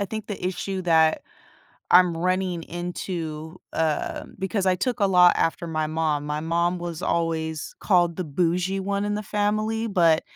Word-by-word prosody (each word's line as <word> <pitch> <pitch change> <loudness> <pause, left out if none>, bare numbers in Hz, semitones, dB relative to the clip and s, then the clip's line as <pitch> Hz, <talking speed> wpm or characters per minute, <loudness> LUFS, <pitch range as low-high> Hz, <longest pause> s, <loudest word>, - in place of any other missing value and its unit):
I 200 - +1
think 220 -1 -5
the 205 - -6
issue 190 +1 -3
that 160 -2 +3 0.7
I'm 180 -2 +6
running 180 0 -1
into 170 -2 -5 0.2
um, 160 -2 -2
because 190 0 -1
I 185 -1 +3
took 245 +5 -2
a 200 - +4
lot 180 -2 +6
after 170 +1 0
my 155 -1 -1
mom. 155 -2 -1
My 150 +1 -2
mom 170 +2 0
was 170 -1 -6
always 160 -2 -2
called 175 -4 +2
the 185 - -3
bougie 180 +5 0
one 200 +1 -1
in 205 0 -1
the 210 - -3
family, 215 +2 0
but 170 -6 +3
175 Hz, 170 wpm, -24 LUFS, 160-190 Hz, 0.7 s, I'm